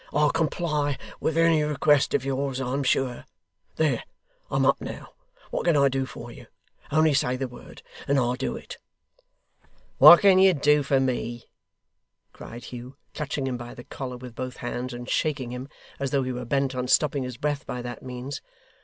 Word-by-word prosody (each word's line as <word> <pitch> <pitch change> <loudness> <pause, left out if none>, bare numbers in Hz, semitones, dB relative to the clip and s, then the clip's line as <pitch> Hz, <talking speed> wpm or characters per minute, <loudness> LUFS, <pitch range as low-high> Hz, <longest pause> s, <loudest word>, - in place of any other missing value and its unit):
'I'll 150 0 +3
comply 150 -3 0 0.2
with 160 - -1
any 165 -2 +4
request 150 -1 +2
of 135 - 0
yours, 135 -1 -2
I'm 135 +2 -1
sure. 130 -2 0 0.5
There 155 -2 +1 0.5
I'm - - +1
up - - +3
now. - - -8 0.4
What - - -2
can 170 -4 +4
I 140 -1 +5
do 135 0 -1
for 120 -2 -9
you? - - -13 0.4
Only 155 0 +4
say 125 -2 +1
the 130 +1 -3
word, 125 - -13 0.2
and 140 - +2
I'll 125 -2 +2
do 130 +1 -3
it.' - - -10 1.2
'What 175 - +10
can 195 -2 +6
you 190 -1 +6
do 150 +1 +4
for 140 -1 +2
me!' 120 -2 -2 0.9
cried 120 +1 -10
Hugh, 125 +2 -9 0.2
clutching 145 -2 -3
him 130 -2 -2
by 120 0 -9
the 120 - -10
collar 125 -1 -6
with 125 -1 -10
both 130 +1 -6
hands, 125 +1 -4
and 120 0 -7
shaking 135 -6 -1
him 125 +2 -6 0.3
as 140 -1 -1
though 135 0 +1
he 130 - -3
were 125 0 -5
bent 135 +2 0
on 125 0 -3
stopping 145 +1 +2
his 125 -2 -5
breath 145 +1 -2
by 125 -1 -4
that 120 0 -6
means. 130 +2 -6
135 Hz, 185 wpm, -26 LUFS, 125-145 Hz, 1.2 s, What